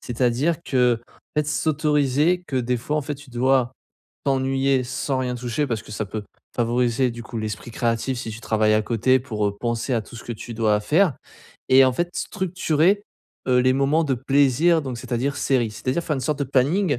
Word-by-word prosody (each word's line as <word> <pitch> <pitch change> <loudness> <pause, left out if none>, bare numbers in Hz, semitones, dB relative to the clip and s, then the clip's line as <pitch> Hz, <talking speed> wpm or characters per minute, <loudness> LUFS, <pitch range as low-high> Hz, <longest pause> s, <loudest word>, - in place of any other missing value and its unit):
C'est-à-dire 125 +6 0
qu'en 125 -5 +2 0.4
fait, 150 -1 +2
s'autoriser 150 +2 +1
que 135 - -3
des 125 0 0
fois 150 +6 -2
en 150 - 0
fait, 145 +2 -4
tu 145 0 -15
dois 125 0 +2 0.5
t'ennuyer 135 -1 +1
sans 130 +2 -2
rien 125 -1 -1
toucher, 125 +4 -2
parce 115 -4 -3
que - - -14
ça 110 - -2
peut 105 +2 -5 0.3
favoriser 120 +1 +1
du 120 0 -8
coup 120 - -6
l'esprit 110 +1 -5
créatif 120 +2 -1
si 115 - -5
tu 110 - -7
travailles 110 -1 +2
à 110 - +2
côté, 120 +4 +2
pour, 110 -5 -2
heu, 100 - -6
penser 120 +2 -1
à 115 - 0
tout 115 - -14
ce 115 - -9
que 120 - -4
tu 115 +1 -8
dois 110 -2 +2
faire. 155 - +3 0.5
Et 130 +1 +7
en 130 - +3
fait, 175 +7 -1
structurer, 185 -1 +1 0.5
heu, 125 - +4
les 130 +1 +4
moments 140 +4 +2
de 140 -3 +1
plaisir, 140 +5 +3
donc 130 -3 -5
c'est-à-dire 130 +4 -2
séries. 120 -5 +1
C'est-à-dire 130 +9 -2
faire 155 - -1
une 135 - -3
sorte 150 +2 -1
de - - +2
planning, 140 +4 +1
130 Hz, 200 wpm, -23 LUFS, 120-145 Hz, 0.5 s, Et